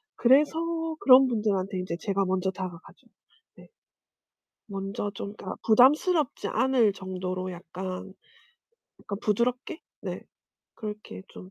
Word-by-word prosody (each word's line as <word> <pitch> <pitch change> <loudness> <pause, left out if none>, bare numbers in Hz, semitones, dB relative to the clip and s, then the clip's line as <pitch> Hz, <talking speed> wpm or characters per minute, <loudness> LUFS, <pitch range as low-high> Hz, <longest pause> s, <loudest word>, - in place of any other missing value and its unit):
그래서 320 +5 +2
그런 265 0 +7
분들한테 205 -5 -1
인제 180 -2 -3
제가 195 -1 0
먼저 190 0 0
다가가죠. 185 -3 -8 0.5
네. - - -15 1.0
먼저 195 +1 -3
좀 200 +1 -6
그러니까 185 - -6
부담스럽지 290 +6 +4
않을 255 -5 +3
정도로 185 -1 -4
약간, 185 +2 -7 0.9
약간 200 -1 -6
부드럽게? 245 - -1 0.2
네. - - -5 0.5
그렇게 210 -2 -7
좀 185 - -12
205 Hz, 260 characters per minute, -27 LUFS, 185-255 Hz, 1.0 s, 그런